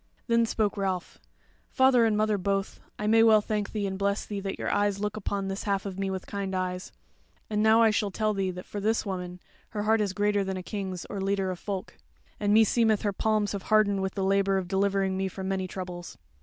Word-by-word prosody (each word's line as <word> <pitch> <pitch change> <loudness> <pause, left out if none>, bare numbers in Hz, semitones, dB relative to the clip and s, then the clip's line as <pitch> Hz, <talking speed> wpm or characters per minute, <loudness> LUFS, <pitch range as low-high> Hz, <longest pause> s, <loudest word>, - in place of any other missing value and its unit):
Then 230 -1 +3
spoke 215 -3 0
Ralph: 190 -3 -3 0.5
"Father 260 -3 +4
and 215 -1 +1
mother 215 -1 +1
both, 195 +1 -2 0.2
I 210 - -4
may 225 +1 +5
well 220 -1 +7
thank 210 -1 -2
thee 210 -2 -2
and 190 0 -3
bless 200 +1 0
thee 205 -1 -4
that 195 0 -4
your - - -2
eyes 205 -1 +1
look 210 0 -2
upon 200 -2 -3
this 195 0 -4
half 200 -1 0
of 195 -1 -5
me 195 0 -1
with 190 -1 -4
kind 195 -1 -4
eyes. 185 0 -3 0.6
And 210 0 +1
now 220 +1 +5
I 225 - +5
shall 210 -1 0
tell 215 +2 0
thee 195 -2 -1
that 180 0 -7
for 205 - -6
this 220 +3 0
woman, 180 -2 -5 0.3
her 210 -1 -3
heart 220 +1 +3
is 200 -3 -1
greater 205 0 +1
than 190 -1 -3
a 185 - -6
king's 190 -3 -5
or 205 - -6
a - - -2
leader 195 -1 0
of 180 - -6
folk. 195 -3 -5 0.4
And 205 -1 +1
meseemeth 220 0 +4
her 205 -1 0
palms 215 0 +1
have 200 - -3
hardened 210 -2 +4
with 190 -1 -3
the 195 - -1
labour 195 0 +2
of 185 -2 -2
delivering 195 0 +1
me 190 0 0
from 190 0 -6
many 190 -1 -1
troubles." 180 -1 -7
200 Hz, 235 wpm, -28 LUFS, 190-210 Hz, 0.6 s, well